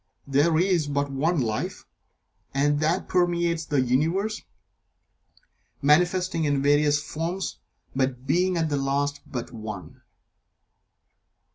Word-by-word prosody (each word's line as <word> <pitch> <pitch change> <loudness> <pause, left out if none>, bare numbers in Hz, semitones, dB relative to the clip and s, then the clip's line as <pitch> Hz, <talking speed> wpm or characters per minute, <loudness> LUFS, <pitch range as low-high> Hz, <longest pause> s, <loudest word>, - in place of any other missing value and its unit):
There 145 +4 +3
is 175 -3 +2
but 140 0 -1
One 155 +5 +1
Life, 110 -4 -2 0.7
and 145 +1 +2
that 160 +4 0
permeates 170 -2 +1
the 145 -3 +1
Universe, 165 - 0 1.4
manifesting 175 +3 +2
in 145 -2 +1
various 145 +1 +4
forms, 165 +5 -4 0.4
but 130 -1 -1
being, 180 +4 +2
at 160 -2 0
the 145 - 0
last, 140 +1 -1
but 120 -2 -5
One. 105 -8 -8
150 Hz, 110 wpm, -25 LUFS, 135-170 Hz, 1.4 s, various